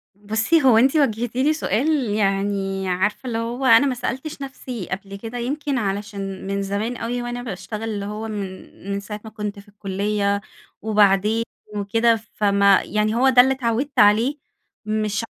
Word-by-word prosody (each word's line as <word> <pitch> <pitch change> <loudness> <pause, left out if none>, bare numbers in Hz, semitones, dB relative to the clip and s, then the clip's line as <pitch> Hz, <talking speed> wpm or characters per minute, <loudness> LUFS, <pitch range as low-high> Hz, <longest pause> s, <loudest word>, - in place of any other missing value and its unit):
بُصّي 220 +10 +1
هو 250 -4 +6
أنتِ 265 +6 +4
وجهتِ 240 -5 +1
لي 280 +4 +3
سؤال 290 -2 0 0.2
يعني 195 -1 0
عارفة 200 +8 -1
اللي 225 -2 -2
هو 235 +3 -3
أنا 255 +3 +6
ما 255 - -1
سألتش 265 +4 -4
نفسي 255 -6 -6
قبل 195 +1 -5
كده، 225 +4 -7
يمكن 280 +3 -2
علشان 200 -2 -4
من 200 0 -1
زمان 205 +5 -2
أوي 240 +1 -3
وأنا 240 0 -4
باشتغل 215 0 -6
اللي 205 -2 -3
هو 215 +2 -5
من 195 -3 -6 0.2
من 200 - -1
ساعة 210 +1 -7
ما 220 - -8
كنت 210 -2 -5
في 200 - -16
الكُلية 200 0 -1 0.4
وبعدين 210 +1 +3 0.3
وكده، 225 +3 +2 0.2
فما 200 -1 +4
يعني 215 +1 0
هو 265 +3 +4
ده 250 -1 +8
اللي 265 +1 +3
اتعودت 260 +2 -1
عليه، 225 +8 +4 0.5
مش 215 0 -1
215 Hz, 165 wpm, -22 LUFS, 200-245 Hz, 0.5 s, ده